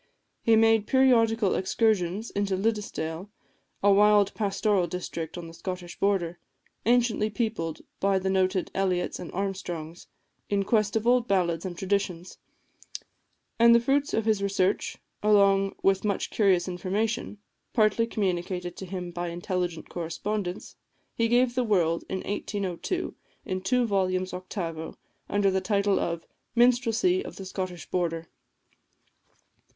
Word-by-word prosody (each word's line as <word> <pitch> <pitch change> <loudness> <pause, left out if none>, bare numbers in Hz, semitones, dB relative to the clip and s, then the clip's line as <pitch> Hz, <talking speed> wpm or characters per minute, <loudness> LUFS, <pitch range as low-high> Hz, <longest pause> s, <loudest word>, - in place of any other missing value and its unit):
He 230 - +4
made 225 -1 +4
periodical 230 -5 +4
excursions 205 0 0
into 200 -1 0
Liddesdale, 195 -4 -2 0.5
a 205 - +6
wild 205 0 +5
pastoral 200 -3 +1
district 170 -1 -5
on 175 - -6
the 165 - -10
Scottish 180 0 -6
border, 180 -4 0 0.5
anciently 235 -3 +3
peopled 210 -8 -2 0.2
by 195 0 +2
the 190 0 -2
noted 185 0 +1
Elliots 185 -2 -1
and - - -7
Armstrongs, 175 -4 -4 0.4
in 200 -1 +1
quest 215 -1 +1
of 225 0 0
old 245 0 +3
ballads 175 -4 +1
and 175 -2 -5
traditions; 185 -2 -2 1.2
and 235 0 +7
the - - +6
fruits 275 +4 +1
of 220 - 0
his 215 -3 +2
research, 195 -1 0 0.2
along 200 -2 +4
with 195 0 +3
much 205 -2 -1
curious 190 -4 +3
information, 200 +5 -2 0.3
partly 225 0 +3
communicated 180 -4 -2
to 190 - -7
him 180 -1 -5
by 175 0 -4
intelligent 175 -1 -3
correspondents, 180 +3 -4 0.4
he 230 - +1
gave 245 +2 +4
to - - -14
the 250 - +3
world, 170 -7 +1
in 190 -1 -2
1802, 205 - -3 0.3
in 185 0 -3
two 245 +6 +2
volumes 185 -3 0
octavo, 175 -3 -5 0.3
under 200 -1 +2
the 190 0 0
title 200 0 +1
of 170 -1 -3 0.3
"Minstrelsy 245 - +3
of - - -9
the 195 - -8
Scottish 185 -2 -5
Border." 165 -2 -1
195 Hz, 135 wpm, -27 LUFS, 180-215 Hz, 1.2 s, and